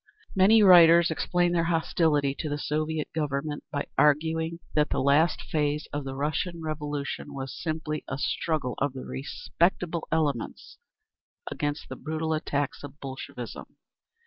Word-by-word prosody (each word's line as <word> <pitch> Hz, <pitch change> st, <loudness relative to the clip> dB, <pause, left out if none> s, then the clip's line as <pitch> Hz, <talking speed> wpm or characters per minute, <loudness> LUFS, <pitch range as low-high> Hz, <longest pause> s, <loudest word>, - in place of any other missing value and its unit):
Many 210 Hz, +3 st, +6 dB
writers 170 Hz, -3 st, +8 dB
explain 175 Hz, +2 st, +1 dB
their 170 Hz, -1 st, +1 dB
hostility 160 Hz, -4 st, +1 dB
to 155 Hz, -, -2 dB
the 145 Hz, -, -2 dB
Soviet 155 Hz, +1 st, -2 dB
Government 150 Hz, -1 st, -2 dB
by 145 Hz, -, -2 dB
arguing 160 Hz, +2 st, +2 dB, 0.2 s
that 150 Hz, 0 st, +2 dB
the -, -, 0 dB
last 145 Hz, +4 st, +3 dB
phase 150 Hz, 0 st, -1 dB
of 145 Hz, -1 st, -3 dB
the 135 Hz, 0 st, -5 dB
Russian 155 Hz, +5 st, -2 dB
Revolution 150 Hz, -2 st, -4 dB
was 135 Hz, -1 st, -5 dB
simply 155 Hz, -1 st, -3 dB
a -, -, -3 dB
struggle 145 Hz, -2 st, -1 dB
of 140 Hz, -1 st, 0 dB
the 130 Hz, -, -7 dB
"respectable" 170 Hz, +4 st, -1 dB
elements 150 Hz, -7 st, -2 dB, 0.7 s
against 145 Hz, +1 st, -3 dB
the -, -, -7 dB
brutal 160 Hz, 0 st, -2 dB
attacks 145 Hz, -2 st, -2 dB
of 145 Hz, +1 st, -10 dB
Bolshevism. 130 Hz, -3 st, -8 dB
155 Hz, 140 wpm, -27 LUFS, 145-165 Hz, 0.7 s, writers